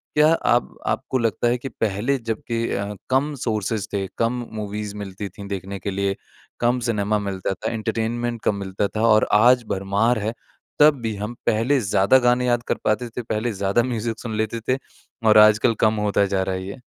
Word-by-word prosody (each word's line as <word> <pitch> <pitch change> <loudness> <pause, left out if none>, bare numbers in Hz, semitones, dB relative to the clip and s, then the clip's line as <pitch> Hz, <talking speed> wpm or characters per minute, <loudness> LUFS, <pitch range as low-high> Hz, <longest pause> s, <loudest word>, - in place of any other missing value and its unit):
क्या 150 0 +6
आप 120 -7 +1
आपको 130 - -1
लगता 115 0 0
है 120 +1 +2
कि 135 +2 -6
पहले 115 +4 -1
जब 115 -3 -4
के 115 0 0
अ, 100 +1 -3 0.2
कम 135 +3 +1
सोर्सेज 110 -1 -1
थे, 100 -1 -1
कम 120 +1 0
मूवीज़ 105 0 -5
मिलती 100 0 -6
थी 100 +2 -10
देखने 100 0 -5
के 100 +3 -4
लिए, 100 0 -1 0.4
कम 120 +1 +2
सिनेमा 105 -1 +1
मिलता 95 -2 -3
था, 110 +3 -4
एंटरटेनमेंट 115 +1 -2
कम 105 - +2
मिलता 100 0 -2
था 110 - 0
और 110 -1 +5
आज 125 +1 +5
भरमार 100 +5 +1
है 110 +2 -2 0.5
तब 150 0 +7
भी, 110 -2 -2
हम 105 +3 -4
पहले 120 +5 +2
ज़्यादा 100 +2 +4
गाने 125 0 +2
याद 120 -1 +1
कर - - +1
पाते 115 +3 0
थे, 120 - -5
पहले 110 +1 -2
ज़्यादा 100 +4 +1
म्यूज़िक 115 -2 -3
सुन 115 -3 -5
लेते 110 +1 -1
थे 130 - +3 0.5
और 110 0 +7
आजकल 110 +2 +6
कम 110 0 +3
होता 100 0 +2
जा 95 -1 0
रहा 95 0 -2
है 95 - -4
ये। 100 +7 -7
110 Hz, 200 wpm, -22 LUFS, 100-120 Hz, 0.5 s, तब